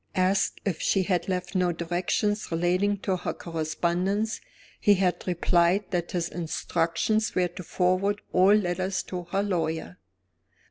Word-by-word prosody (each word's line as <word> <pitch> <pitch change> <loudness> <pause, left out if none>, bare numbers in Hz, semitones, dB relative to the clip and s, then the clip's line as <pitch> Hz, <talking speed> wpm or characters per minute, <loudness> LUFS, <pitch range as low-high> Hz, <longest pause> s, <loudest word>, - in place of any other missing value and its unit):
Asked 190 +2 +1
if 185 -6 -1
she 195 - +2
had 180 -1 -1
left 180 -1 -2
no 180 -2 +2
directions 175 +5 -1
relating 180 +5 +1
to 190 -2 0
her - - -4
correspondence, 175 +6 -1 0.4
he 205 - +5
had 185 -2 0
replied 175 +2 +2
that 175 -2 -2
his 175 -2 0
instructions 170 +5 -1
were 180 -1 +2
to 185 - -9
forward 185 +3 +1
all 190 +3 +6
letters 185 -1 0
to 180 -2 -6
her 195 +4 -1
lawyer. 165 - -2
180 Hz, 140 wpm, -27 LUFS, 175-195 Hz, 0.4 s, all